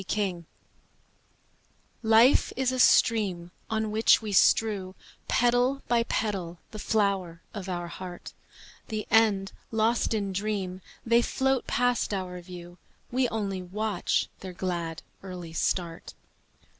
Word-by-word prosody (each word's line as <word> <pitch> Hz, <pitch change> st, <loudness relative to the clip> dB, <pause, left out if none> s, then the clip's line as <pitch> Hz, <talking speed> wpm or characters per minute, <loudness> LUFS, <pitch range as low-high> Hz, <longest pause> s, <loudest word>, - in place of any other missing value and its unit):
Petals 185 Hz, -5 st, -2 dB, 1.6 s
Life 225 Hz, +3 st, +5 dB
is 255 Hz, 0 st, +1 dB
a 255 Hz, -, -2 dB
stream 195 Hz, -9 st, +3 dB, 0.2 s
On 220 Hz, -1 st, -1 dB
which 220 Hz, +1 st, +5 dB
we 215 Hz, -2 st, -5 dB
strew 195 Hz, -1 st, +3 dB, 0.3 s
Petal 245 Hz, +3 st, +2 dB
by 235 Hz, -1 st, +3 dB
petal 195 Hz, -7 st, -2 dB
the 215 Hz, -, -7 dB
flower 195 Hz, -6 st, 0 dB
of 195 Hz, -3 st, -6 dB
our 175 Hz, -1 st, -3 dB
heart; 180 Hz, 0 st, -8 dB, 0.5 s
The 215 Hz, -2 st, -3 dB
end 205 Hz, -3 st, +3 dB, 0.2 s
lost 225 Hz, +1 st, +1 dB
in 200 Hz, -2 st, -2 dB
dream, 195 Hz, -2 st, -3 dB, 0.2 s
They 235 Hz, +1 st, +4 dB
float 265 Hz, +1 st, 0 dB
past 245 Hz, -4 st, +1 dB
our 180 Hz, -2 st, -5 dB
view, 175 Hz, 0 st, -11 dB, 0.3 s
We 250 Hz, 0 st, +1 dB
only 200 Hz, -4 st, -3 dB
watch 200 Hz, +1 st, -1 dB
their 185 Hz, -1 st, -8 dB
glad, 170 Hz, -3 st, -3 dB, 0.2 s
early 180 Hz, -4 st, -8 dB
start. 165 Hz, 0 st, -2 dB
200 Hz, 120 wpm, -27 LUFS, 180-225 Hz, 1.6 s, Life